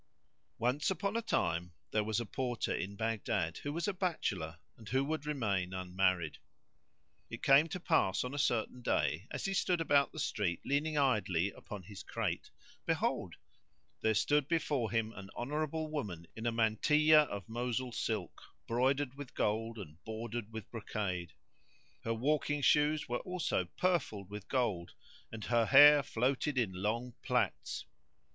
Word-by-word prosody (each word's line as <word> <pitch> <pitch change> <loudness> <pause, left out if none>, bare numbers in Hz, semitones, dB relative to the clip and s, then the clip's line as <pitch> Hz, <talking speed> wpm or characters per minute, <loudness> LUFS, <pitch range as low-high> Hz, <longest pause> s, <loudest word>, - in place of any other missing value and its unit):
Once 125 +6 +1
upon 195 +3 -1
a 230 - +1
time 85 - 0 0.2
there 110 - +2
was 110 +1 0
a 120 - -3
Porter 125 +1 -2
in 100 +2 -3
Baghdad, 110 -7 -1
who 145 - -4
was 170 +6 -2
a 205 - 0
bachelor 100 - -2 0.2
and 110 -3 -12
who 130 +3 +2
would 155 0 -3
remain 100 -10 -1
unmarried. 90 -3 0 0.9
It - - -8
came 140 +4 +6
to 180 +3 -5
pass 160 - +2
on 125 +1 -5
a 145 - -3
certain 120 -1 0
day, 95 -4 0
as - - -4
he 195 - 0
stood 180 -2 +1
about 145 -3 +3
the - - -12
street 105 - -1
leaning 150 +2 0
idly 100 - +2
upon 100 -1 -9
his 100 +2 -9
crate, - - -3 0.4
behold, - - 0 0.7
there 110 0 +2
stood 145 +4 +2
before 145 -8 0
him 115 -1 0
an 100 -1 -9
honourable 155 +4 -2
woman 100 - -4
in 115 +1 -3
a - - +2
mantilla 150 +8 +5
of 100 -7 -6
Mosul[FN#138] 120 +2 -2
silk, 105 -7 -3 0.2
broidered 130 +3 +1
with 140 -2 -9
gold 115 +2 0
and 85 -4 -10
bordered 115 0 -5
with 110 -2 -7
brocade; 95 -7 -3 0.7
her 115 - 0
walking 145 +4 +1
shoes 150 +2 +3
were 120 0 -1
also 180 - -1
purfled 140 - 0
with 105 -1 -7
gold 105 -10 -1 0.4
and 110 -1 -7
her 120 -2 +2
hair 145 +5 +9
floated 135 +3 0
in 110 -7 +1
long 115 +6 -2
plaits. - - -1
120 Hz, 155 wpm, -34 LUFS, 100-145 Hz, 0.9 s, hair